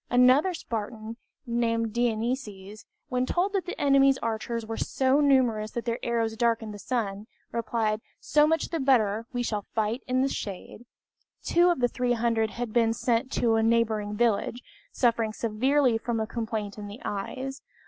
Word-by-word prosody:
Another 255 +9 +4
Spartan, 225 -3 -5 0.3
named 230 -2 0
Dienices, 220 -3 -2 0.2
when 250 0 0
told 380 +4 0
that 385 -2 -1
the 360 - -5
enemy's 275 -1 +4
archers 230 0 -3
were 225 +1 -4
so 265 +4 +1
numerous 250 -7 +3
that 235 +1 -5
their 235 -1 -1
arrows 230 -2 -1
darkened 225 -2 0
the 205 - -9
sun, 210 -3 -3 0.2
replied, 220 -2 -1 0.2
"So 300 0 +3
much 325 0 0
the 330 - -2
better, 230 -5 +2
we 245 -1 -2
shall 210 -4 -3
fight 220 +3 0
in 255 0 +2
the - - +2
shade." 215 0 -6 0.6
Two 345 +1 +4
of 345 -7 0
the 245 - +4
300 235 -2 0
had 235 +1 -5
been 230 -2 +3
sent 240 +3 0
to 235 -2 +2
a - - +3
neighboring 220 -2 +1
village, 235 +1 0 0.3
suffering 230 - +1
severely 240 +3 +1
from 235 0 -2
a 220 - 0
complaint 220 -3 -4
in 205 - -6
the 205 +4 -9
eyes. 260 +7 -4
230 Hz, 165 wpm, -27 LUFS, 220-255 Hz, 0.6 s, Another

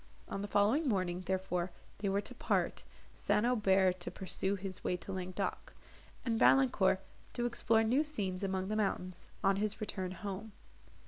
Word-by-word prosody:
On 195 - -4
the 205 - -3
following 220 +10 +3
morning, 185 -4 0
therefore, 185 -1 -1 0.3
they 200 -1 0
were 200 +1 +1
to - - -6
part, - - 0 0.3
St. 210 - +1
Aubert 190 -6 +3
to 175 - -4
pursue 190 +1 -1
his 190 -1 -6
way 180 - 0
to 180 +3 -7
Languedoc, 185 -1 -3 0.5
and 225 -2 +1
Valancourt 195 -8 +5 0.3
to 240 - -1
explore 230 -2 +3
new 250 +7 +3
scenes 205 -11 -3
among 190 0 -1
the 215 - 0
mountains, 185 -4 -2 0.2
on 195 0 +4
his 210 0 -1
return 190 -3 -3
home. 200 +3 -6
195 Hz, 165 wpm, -34 LUFS, 185-215 Hz, 0.5 s, Valancourt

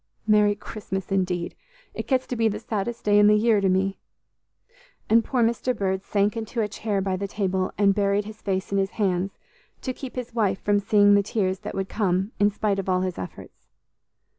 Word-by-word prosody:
Merry 210 -1 +4
Christmas, 195 -2 -6
indeed; 180 -3 -1 0.4
it - - -5
gets 260 -1 +1
to 250 - -4
be 225 -1 +2
the 210 - -1
saddest 225 +2 -4
day 205 0 +5
in 205 - +6
the 210 - +6
year 215 -1 +3
to 195 - +2
me!" 190 +1 0 1.1
and 230 +1 +6
poor 250 -1 +1
Mr. 235 +1 0
Bird 190 -1 -1
sank 205 +2 +1
into 225 +1 -4
a 215 - +1
chair 205 -1 -2
by 190 -1 -1
the 200 +2 -3
table, 190 -2 -1
and 200 -1 +4
buried 200 0 +1
his 215 +1 -10
face 190 -1 -2
in 200 - +2
his 195 0 0
hands, 195 -2 0 0.4
to 260 - -3
keep 260 0 -8
his 250 -2 -5
wife 205 -5 +1
from 205 0 +2
seeing 205 0 +4
the 200 - +5
tears 195 -2 -1
that - - -7
would 195 0 -2
come 190 -1 0
in 205 0 +5
spite 205 -1 -1
of 195 - -3
all 185 0 +2
his 185 -1 -3
efforts. 90 - -10
205 Hz, 210 wpm, -25 LUFS, 190-215 Hz, 1.1 s, in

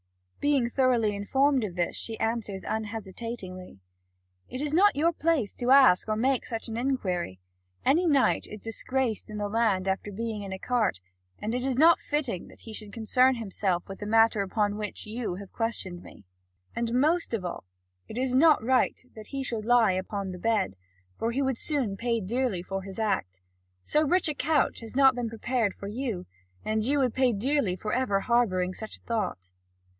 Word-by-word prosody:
Being 285 -4 +2
thoroughly 240 -6 +2
informed 265 +6 +2
of 190 -5 -4
this, 175 -1 -1
she 225 -1 -2
answers 225 -4 -2
unhesitatingly: 210 - -5 0.7
"It 255 - -5
is 295 +1 -2
not 405 +5 +5
your 330 +4 +2
place 310 - 0
to 245 - -3
ask 260 -8 +6
or 215 - +1
make 255 +3 +1
such 225 -1 -4
an 225 - -5
inquiry. 190 - -2 0.5
Any 335 +7 +3
knight 280 -4 +3
is 210 - -8
disgraced 225 +1 -2
in 210 - -6
the 205 0 -1
land 205 -3 +1
after 195 +2 -1
being 220 +1 -4
in 195 -1 -6
a 190 - -4
cart, 230 - 0 0.4
and 215 +2 -3
it 250 0 -1
is 265 -2 -1
not 325 +4 +6
fitting 280 - -2
that - - -16
he 225 - -10
should 215 -1 -5
concern 250 +4 +3
himself 195 -5 -1
with 195 - -8
the 205 - -5
matter 225 -1 +4
upon 205 +1 0
which 210 -1 -5
you 215 -3 -4
have 195 0 -10
questioned 195 -6 -3
me; 100 - -14 0.5
and 235 0 -1
most 310 0 +2
of 190 -5 -4
all 170 - -5 0.4
it 220 - -8
is 255 0 0
not 300 0 +5
right 255 +2 +2 0.2
that 215 -1 -10
he 275 -1 -4
should 230 -4 -2
lie 240 -3 +5
upon 190 +1 -3
the 180 -1 -7
bed, 215 - 0 0.4
for 230 - 0
he 265 +4 0
would 265 -3 -1
soon 265 -10 0
pay 230 +2 0
dearly 220 -2 -1
for 195 +1 -4
his 190 0 -8
act. 95 - -1 0.4
So 300 - +2
rich 350 +5 +2
a 305 - 0
couch 295 +1 +1
has 225 +1 -9
not 270 -1 +6
been 240 -2 -3
prepared 225 -2 -1
for 200 - -8
you, 225 -3 -3 0.4
and 215 0 0
you 280 +5 +1
would 255 -4 +2
pay 260 -2 +3
dearly 230 -2 0
for 210 +3 -4
ever 235 -6 +1
harbouring 185 -7 +1
such 220 +3 -6
a - - -31
thought." 90 - -3
225 Hz, 190 wpm, -28 LUFS, 200-260 Hz, 0.7 s, ask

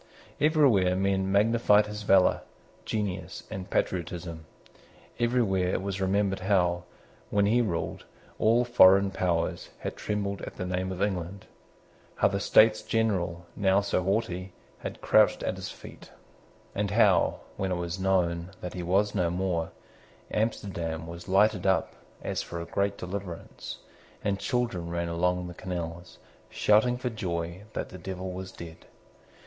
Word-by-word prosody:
Everywhere 135 - +4
men 95 0 +1
magnified 105 0 +4
his 105 0 -6
valour, 95 -3 +4 0.4
genius, 100 -4 -3
and 95 0 -6
patriotism. 85 -3 -2 0.7
Everywhere 115 -7 +2
it - - -1
was 95 -1 -3
remembered 95 0 +1
how, 90 -3 +1 0.4
when 100 0 +2
he 115 +4 +3
ruled, 90 -8 -3 0.3
all 115 +3 +4
foreign 100 -5 +6
powers 85 -3 -1
had - - -4
trembled 100 -1 -3
at - - -7
the 90 - -4
name 90 +1 -2
of 95 +1 -2
England, 95 -1 -3 0.7
how - - +3
the 100 0 -1
States 110 +2 +5
General, 90 -7 -1
now 95 -1 +3
so 100 -2 0
haughty, 95 -2 -1 0.3
had - - -7
crouched - - +4
at - - -1
his - - -6
feet, - - -12 0.6
and 100 0 -1
how, 100 -4 +3
when 95 -1 -2
it - - +1
was 85 +1 -3
known 90 -2 +1
that 90 - -6
he 90 - -4
was 100 +4 +1
no 90 -4 +1
more, 90 -2 -1 0.6
Amsterdam 85 -7 -2
was 85 +1 -9
lighted 100 0 +3
up 95 - +2 0.3
as - - -2
for 85 - -6
a 85 - -5
great 100 +3 -1
deliverance, 90 -2 -6 0.5
and 100 -1 0
children 120 -10 -1
ran 85 0 -2
along 90 +1 0
the 90 - -7
canals, 85 -1 -6 0.3
shouting 110 +4 +3
for 125 0 -3
joy 85 -4 -3
that - - -4
the 95 - -10
Devil 95 +1 -5
was 95 +1 -6
dead. 85 -3 -11
95 Hz, 145 wpm, -28 LUFS, 90-105 Hz, 0.7 s, foreign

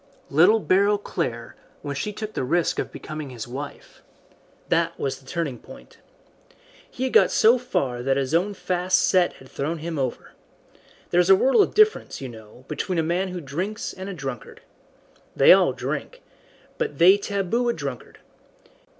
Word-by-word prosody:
"Little 180 +10 +5
Beryl 200 +1 +3
Clare, 115 - -4 0.3
when 145 -1 -4
she 210 +10 -3
took 215 +1 -7
the - - -2
risk 165 +6 0
of - - -3
becoming 155 -2 -7
his 120 -3 -7
wife. 140 +4 -9 0.7
That - - 0
was 135 - -3
the 135 - -22
turning 150 -8 -3
point. 270 +1 -15 0.9
He 255 - -6
had 260 - -2
got - - +6
so 235 +3 +4
far 130 - -2
that 135 +2 +1
his 135 +1 -2
own 190 +5 +1
fast 180 0 0
set 180 -2 +3
had 130 - -16
thrown 150 +6 -3
him 160 -1 -5
over. 130 -3 -4 0.8
There 175 - +3
is 175 - 0
a 190 - +9
world 265 - +4
of - - 0
difference, 430 +1 +3
you 135 - -6
know, 110 +2 -14
between 165 +4 -3
a 165 - +2
man 175 +4 0
who 180 -1 -5
drinks 175 +10 -4
and 190 +1 -7
a - - -5
drunkard. 135 -5 -7 0.7
They - - +8
all - - +4
drink, - - -5 0.6
but 475 -3 -2
they 185 +3 +7
taboo 205 +4 -1
a - - +1
drunkard. 140 - -7
170 Hz, 175 wpm, -24 LUFS, 135-200 Hz, 0.9 s, a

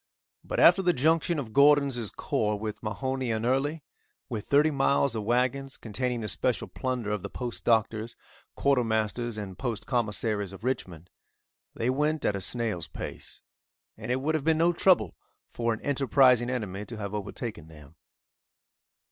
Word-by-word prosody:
But - - -3
after 195 - +7
the 180 -1 +3
junction 160 +4 +2
of 120 -7 -5
Gordon's 140 -5 +4
corps 105 +3 -1
with 105 0 -5
Mahone 130 +5 -3
and 110 +1 -1
Early, 140 +5 0 0.5
with 110 -5 -5
thirty 150 +2 +4
miles 140 -2 +2
of 110 -2 -3
wagons, 130 +4 0
containing 120 +2 -3
the 105 - -3
special 125 +3 -1
plunder 125 -5 -3
of 105 -2 -2
the - - -6
Post 120 -2 -6
Doctors, 110 0 +1 0.4
Quartermasters 120 -3 0
and 95 -3 -7
Post 115 -5 -3
Commissaries 105 -4 -1
of 95 +2 -11
Richmond, 90 -9 -4 0.6
they 120 +2 0
went 150 +3 0
at 105 - +1
a 100 - -3
snail's 110 -6 -2
pace, - - -8 0.5
and - - -5
it 130 +1 0
would 155 +3 0
have 155 -3 -1
been 160 +1 +3
no 170 +2 +3
trouble 170 - +3 0.4
for 115 0 0
an 110 - -2
enterprising 130 -3 +4
enemy 105 -6 -3
to 115 - -8
have 100 -1 -5
overtaken 105 -4 -5
them. 75 -1 -15
120 Hz, 160 wpm, -28 LUFS, 105-135 Hz, 0.6 s, after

